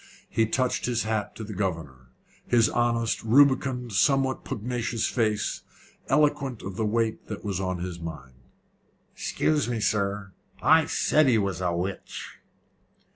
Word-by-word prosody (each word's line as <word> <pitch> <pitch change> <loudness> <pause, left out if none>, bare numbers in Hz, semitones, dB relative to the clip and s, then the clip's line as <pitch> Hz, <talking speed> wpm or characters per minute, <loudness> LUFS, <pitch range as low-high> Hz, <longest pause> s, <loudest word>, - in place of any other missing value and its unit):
He 115 -1 +1
touched 125 +2 0
his 120 -2 0
hat 110 -1 -2
to 110 - -6
the 105 0 -7
governor 80 -10 -4 0.4
his 115 -2 +4
honest, 115 -1 0
rubicund, 130 -1 +3
somewhat 135 +6 +2
pugnacious 115 0 -2
face, 110 -3 0 0.5
eloquent 140 -4 +1
of 95 -1 -6
the 110 -1 0
weight 115 0 -1
that 105 - -7
was 100 -3 -2
on 95 -1 -2
his 90 0 -5
mind. 75 -6 -8 0.8
"Excuse 150 -5 0
me, 120 -2 -1
sir. 100 -2 -1 0.3
I - - +5
said 155 -2 +3
he 120 -3 +4
was 100 -4 -1
a 90 -1 +1
witch." 90 +3 -5
110 Hz, 140 wpm, -26 LUFS, 95-125 Hz, 0.8 s, I